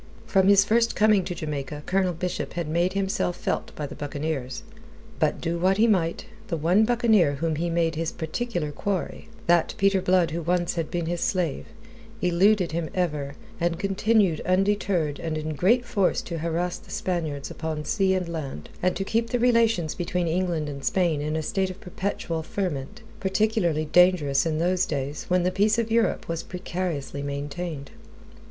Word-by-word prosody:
From 190 -1 +3
his 200 0 +6
first 230 +2 +2
coming 210 -2 +4
to 175 - -4
Jamaica, 150 -2 -5
Colonel 185 -1 +1
Bishop 180 +2 -3
had 170 -2 -3
made 170 +4 +1
himself 190 -2 -1
felt - - -2
by 150 - -4
the - - -7
buccaneers. 145 -2 -4 0.6
But 155 -2 +1
do 170 0 -2
what 190 +2 +3
he 220 - +5
might, 180 -7 +1 0.2
the 165 - -2
one 180 +8 +3
buccaneer 220 -10 +3
whom 160 +2 -1
he 170 +2 -1
made 165 -1 +1
his 165 0 -2
particular 170 -1 -3
quarry 190 +5 -3 0.2
that 170 -1 +3
Peter 195 -1 +3
Blood 180 -3 +3
who 170 +2 -2
once 175 +1 0
had 165 -3 -2
been 175 -1 -2
his 175 +1 -2
slave 175 -7 -1 0.5
eluded 180 +1 +3
him 165 0 -2
ever, 150 -6 -1 0.2
and 170 -1 0
continued 195 -3 +2
undeterred 185 -5 +1
and 160 -1 -3
in 155 0 -3
great 230 - +3
force 200 -5 +1
to 170 -2 -5
harass 170 +2 -1
the - - -19
Spaniards 160 -6 -3
upon 155 -2 -4
sea 190 -3 +2
and 185 -2 -1
land, 145 - -6
and 180 0 +1
to 195 - -2
keep 230 +3 0
the 245 - +1
relations 230 -9 +3
between 175 0 -2
England 170 -2 0
and 140 -2 -6
Spain 170 -4 +1
in 155 +1 -2
a 160 - -1
state 190 +4 0
of 185 - -8
perpetual 180 -3 -3
ferment, 155 -6 -4 0.2
particularly 190 -5 +1
dangerous 165 -4 +4
in 155 -1 0
those 180 +3 +1
days 140 0 -3
when 180 0 +2
the 180 - +1
peace 210 +4 +2
of 230 -1 -1
Europe 230 0 +1
was 165 -1 -2
precariously 175 -6 -4
maintained. 145 +2 -5
175 Hz, 175 wpm, -25 LUFS, 155-195 Hz, 0.6 s, his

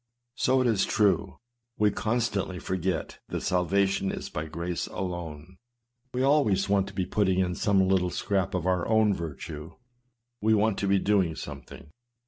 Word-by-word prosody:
So 130 0 +2
it - - +1
is 110 -4 +2
true: 100 -2 +1 0.4
we 105 -1 +3
constantly 110 -3 -1
forget 90 -2 -3
that - - -4
salvation 95 +2 +1
is - - -6
by 75 - -3
grace 85 +2 -3
alone. 85 -2 -6 0.5
"We 125 +1 -1
always 130 -10 +3
want 100 -1 +2
to 100 - -10
be 95 - 0
putting 95 -2 +1
in 90 -1 +1
some 95 0 +2
little 95 -1 +2
scrap 95 0 -1
of 90 -2 -2
our 90 -1 +1
own 110 -2 +4
virtue; 80 -1 -7 0.7
we 110 +1 +4
want 105 -1 +1
to 100 - -1
be 100 0 +4
doing 95 -5 +2
something. 75 - -9
95 Hz, 160 wpm, -27 LUFS, 90-105 Hz, 0.7 s, own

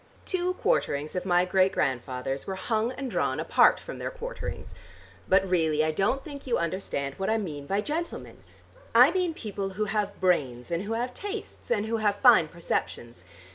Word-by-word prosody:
Two 365 -1 0
quarterings 150 - 0
of 180 - -3
my 180 0 +4
great 190 +1 +3
grandfathers 130 0 -2
were 190 - -3
hung 220 +4 -1
and 260 -1 -5
drawn - - 0
apart - - +4
from - - -8
their - - -3
quarterings. - - -6 0.6
But 190 0 +4
really 160 -4 +2
I 155 - +1
don't 200 +11 0
think 285 -3 -9
you 245 - +2
understand 165 -5 -2
what 195 - -1
I 220 - +2
mean 150 -9 -5
by 200 +4 +1
gentlemen. 320 +8 -4 0.6
I 250 +6 +8
mean 360 -3 0
people 200 -5 -4
who 215 - +1
have 205 0 -2
brains, 135 -9 0
and 170 +4 -1
who 220 - -2
have 245 +2 -2
tastes 410 - -7
and 215 -3 +1
who 225 +1 -1
have 210 -2 +1
fine 215 -7 +6
perceptions. 120 - -4
195 Hz, 180 wpm, -27 LUFS, 165-245 Hz, 0.6 s, I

